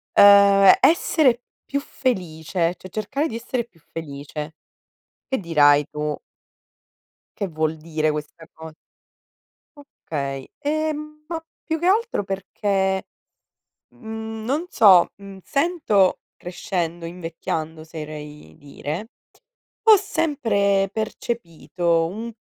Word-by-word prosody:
uhm, 200 -1 +8
essere 290 -7 +3 0.2
più 280 - -1
felice, 175 - -2
cioè, 185 - -12
cercare 270 - -2
di 225 - -6
essere 235 +1 -3
più 180 -8 -27
felice. 150 0 -7 0.7
Che 265 - 0
dirai, 145 - +4
tu 150 0 -3 1.2
"che 200 -2 -2
vuol 155 -1 -1
dire 155 -1 -1
questa 150 +2 -7
co" 160 0 -10 1.1
Okay. 140 - -6
E, 310 +1 0
mhmm, 305 0 -9
ma 330 -1 -4 0.2
più 320 -1 -2
che 345 - -2
altro 435 - +2
perché, 195 0 -1 0.8
mhmm, 220 -1 -7
non 290 +8 -1
so, 190 - +6
mhmm, 200 -1 -11
sento 280 - +2 0.2
crescendo, 175 -1 -4
invecchiando, 165 -2 -5
oserei 150 - -9
dire, 150 - -6 0.7
ho 435 -1 +8
sempre 225 - +1
percepito, 175 -6 -1
un 225 +6 -6
195 Hz, 105 wpm, -23 LUFS, 160-240 Hz, 1.2 s, uhm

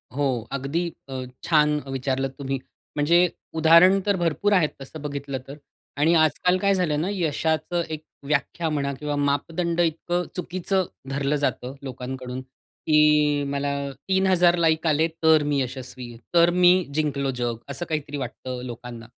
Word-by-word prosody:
हो 145 0 +1 0.3
अगदी 140 +6 -1 0.2
अ, 130 -1 -4 0.2
छान 150 -2 +3
विचारलंत 135 0 -1
तुम्ही, 135 -1 -2 0.4
म्हणजे 170 +4 +4 0.3
उदाहरण 170 +4 +7
तर 200 -1 +2
भरपूर 175 +5 +1
आहेत 165 -6 +4
तसं 145 +3 -9
बघितलं 140 -2 -4
तर 140 +2 -9 0.4
आणि 160 +4 +3
आजकाल 165 +3 +3
काय 200 +1 +2
झालंय 170 -6 +1
ना, 170 +6 -1
यशाचं 165 -1 0
एक 155 0 -5 0.2
व्याख्या 150 +3 -1
म्हणा 140 -2 -1
किंवा 150 -1 -2
मापदंड 165 +4 -1
इतकं 175 +2 0
चुकीचं 185 +1 -1 0.2
धरलं 140 +1 0
जातं 135 -2 -2
लोकांकडून, 130 0 -6
की 150 +2 +2
मला 140 0 -1 0.4
3000 185 -2 +4
लाइक 160 -1 +2
आले, 155 +2 +3 0.2
तर 160 -2 +6
मी 145 -2 +1
यशस्वी, 125 -1 -6 0.2
तर 170 0 +6
मी 180 0 +6 0.2
जिंकलो 140 -3 0
जग. 120 -2 -2
असं 140 +5 -4
काहीतरी 145 -2 -3
वाटतं 130 -1 -5
लोकांना 120 -1 -8
150 Hz, 145 wpm, -24 LUFS, 135-170 Hz, 0.4 s, उदाहरण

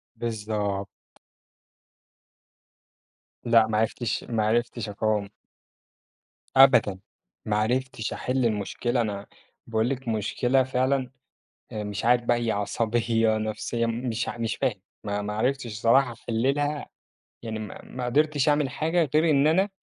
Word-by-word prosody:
بالضبط. 105 -3 -3 2.6
لأ، 115 -2 +5
ما 110 - 0
عرفتش 110 +1 -1
ما 110 -2 -1
عرفتش 120 0 0
أقاوم. 105 -1 -1 1.3
أبدًا، 130 -8 +6 0.5
ما 105 -1 0
عرفتش 125 +1 -1
أحل 130 0 -1
المشكلة، 115 +3 0
أنا 100 -3 -4 0.4
باقول 110 +1 +1
لِك 135 -1 -4
مشكلة 120 +4 +1
فعلًا، 130 0 0 0.6
آآ، 105 - -4
مش 105 +1 -4
عارف 120 0 +4
بقى 120 0 +2
هي 115 -1 0
عصبية 110 +2 +1
نفْسية، 110 +2 -2
مش 115 0 -2
ع - - -6
مش 115 -1 -2
فاهم 115 -8 -1 0.2
ما 105 0 -3
عرفتش 130 +5 0
الصراحة 120 +3 +2
أحلّلها، 135 +6 -1 0.5
يعني 110 -1 -4
ما 105 -2 -7
ما 125 -1 -6
قدرتش 150 +2 +2
أعمل 145 -2 +2
حاجة 160 +3 0
غير 160 +2 +4
إن 145 -1 +4
أنا 190 +6 +3
115 Hz, 125 wpm, -26 LUFS, 110-130 Hz, 2.6 s, أبدًا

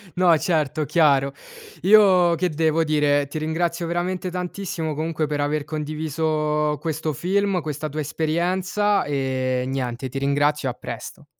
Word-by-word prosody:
No, 175 -2 +5
certo, 155 -2 0
chiaro. 140 -3 +3 0.5
Io 185 -4 +6
che 180 +2 0
devo 160 +1 +1
dire? 145 -2 +2
Ti 145 - -6
ringrazio 170 +2 -1
veramente 180 +2 -2
tantissimo, 180 -2 -4
comunque, 155 0 -2
per 145 0 -2
aver 145 +1 0
condiviso 150 0 -1
questo 160 -1 -2
film, 190 +4 0
questa 155 0 -4
tua 150 +2 -5
esperienza 180 +7 0
e, 130 -3 -1
niente, 130 -1 -3
ti 135 - -6
ringrazio 145 0 +1
e - - -1
a - - -10
presto. - - -8
155 Hz, 140 wpm, -23 LUFS, 145-175 Hz, 0.5 s, Io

